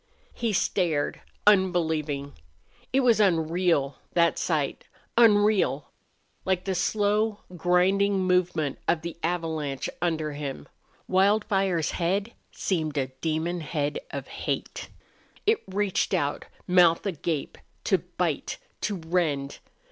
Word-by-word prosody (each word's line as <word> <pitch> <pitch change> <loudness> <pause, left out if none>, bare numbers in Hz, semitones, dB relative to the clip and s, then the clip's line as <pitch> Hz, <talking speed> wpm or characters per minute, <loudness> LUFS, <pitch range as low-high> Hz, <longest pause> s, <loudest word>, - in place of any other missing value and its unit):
He 230 -2 -1
stared, 175 -6 0 0.2
unbelieving. 160 -8 +2 0.6
It 270 - +3
was 235 -4 +4
unreal, 165 -6 +2 0.2
that 170 -1 +3
sight 150 -5 -1 0.3
unreal 205 - +4 0.5
like 185 -1 0
the 190 - 0
slow, 210 +3 +1
grinding 190 +3 +3
movement 175 -6 +1
of 160 -2 +1
the 170 -1 -5
avalanche 160 -5 -2
under 160 -3 0
him. 140 - -6 0.4
Wildfire's 195 -3 +2
head 195 +6 -1 0.2
seemed 155 -5 -2
a 130 -2 0
demon 165 +2 -1
head 150 -2 -2
of - - -6
hate. - - -4 0.6
It 435 +1 +3
reached 195 0 0
out, 145 0 -1 0.2
mouth 175 -1 +4
agape, 165 -5 -3 0.2
to - - +2
bite, - - -3 0.2
to 205 +1 -1
rend. 160 -5 -1
175 Hz, 110 wpm, -26 LUFS, 155-195 Hz, 0.6 s, was